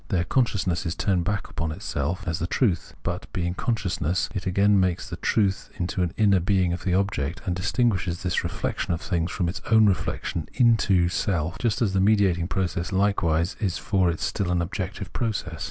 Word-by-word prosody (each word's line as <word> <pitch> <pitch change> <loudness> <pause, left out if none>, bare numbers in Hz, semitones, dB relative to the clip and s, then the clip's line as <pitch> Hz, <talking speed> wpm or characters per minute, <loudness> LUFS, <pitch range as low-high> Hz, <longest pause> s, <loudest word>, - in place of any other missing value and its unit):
There 90 -3 +1
consciousness 95 -7 0
is 85 - -2
turned 95 -5 0
back 100 -1 -1
upon 85 -2 -3
itself 85 +5 -3
as 80 -1 -1
the 85 - -1
truth; 100 -3 0
but, - - -4
being 90 -1 -1
consciousness, 95 -5 -1
it 95 -2 -3
again 100 +2 +4
makes 90 -1 0
this 85 - -7
truth 100 -3 +1
into 90 +1 -2
an 90 -2 0
inner 100 -3 +4
being 90 -1 +1
of 90 - -5
the 90 -2 +1
object, 95 -6 -1
and 90 - -1
distinguishes 95 -2 0
this 90 -1 0
reflection 85 - -2
of 80 - -8
things 85 -2 -1
from 90 -2 -1
its 85 - -4
own 110 -1 +6
reflection 90 -4 -1
into 110 -8 +4
self: 85 -3 -1
just 115 -1 +1
as 100 -4 0
the 95 - +2
mediating 95 -4 +3
process 90 -2 -2
likewise 95 -4 +1
is 100 -6 -1
for 95 -4 +1
it 85 - -2
still 100 -4 -1
an 90 0 +1
objective 95 0 -5
process. 95 -9 -2
95 Hz, 190 wpm, -25 LUFS, 85-100 Hz, -, own